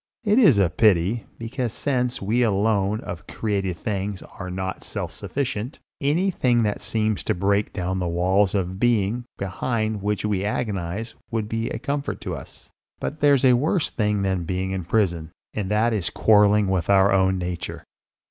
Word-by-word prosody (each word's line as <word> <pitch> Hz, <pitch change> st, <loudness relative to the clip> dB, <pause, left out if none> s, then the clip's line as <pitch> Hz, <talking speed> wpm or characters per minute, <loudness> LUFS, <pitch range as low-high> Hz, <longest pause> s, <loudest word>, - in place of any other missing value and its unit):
It 210 Hz, +2 st, +4 dB
is 155 Hz, -, +6 dB
a 100 Hz, -2 st, +4 dB
pity, 95 Hz, +3 st, +2 dB
because 120 Hz, 0 st, -3 dB
since 125 Hz, -4 st, -1 dB
we 115 Hz, +5 st, +1 dB
alone 105 Hz, -1 st, +1 dB
of 90 Hz, +1 st, -7 dB
created 100 Hz, -5 st, -2 dB
things 100 Hz, -1 st, -3 dB
are 90 Hz, -2 st, -8 dB
not 95 Hz, +1 st, -4 dB
self -, -, -4 dB
sufficient, 130 Hz, -2 st, -3 dB, 0.2 s
anything 145 Hz, -6 st, +2 dB
that 105 Hz, -1 st, -1 dB
seems 110 Hz, -1 st, -1 dB
to -, -, 0 dB
break 100 Hz, +3 st, +1 dB
down 95 Hz, 0 st, -2 dB
the 90 Hz, -, -1 dB
walls 95 Hz, +4 st, +2 dB
of 95 Hz, -1 st, -2 dB
being 120 Hz, 0 st, +1 dB
behind 110 Hz, +2 st, -2 dB
which 105 Hz, +1 st, -1 dB
we 100 Hz, -2 st, 0 dB
agonise 105 Hz, 0 st, -3 dB, 0.2 s
would 110 Hz, -2 st, -2 dB
be 115 Hz, +1 st, -2 dB
a -, -, -3 dB
comfort 140 Hz, +3 st, -3 dB
to -, -, -4 dB
us; -, -, -12 dB, 0.3 s
but 155 Hz, -, -4 dB
there's 140 Hz, -2 st, +4 dB
a 125 Hz, -, +7 dB
worse 150 Hz, +7 st, +1 dB
thing 105 Hz, -2 st, 0 dB
than 95 Hz, -2 st, 0 dB
being 95 Hz, +2 st, -2 dB
in 95 Hz, -3 st, -3 dB
prison, 85 Hz, -6 st, 0 dB, 0.2 s
and 100 Hz, -3 st, -3 dB
that 110 Hz, +3 st, +2 dB
is 100 Hz, -5 st, 0 dB
quarrelling 105 Hz, -1 st, +4 dB
with 95 Hz, -2 st, 0 dB
our 100 Hz, 0 st, +5 dB
own 95 Hz, 0 st, +3 dB
nature. 90 Hz, -2 st, -4 dB
105 Hz, 170 wpm, -24 LUFS, 95-115 Hz, 0.3 s, a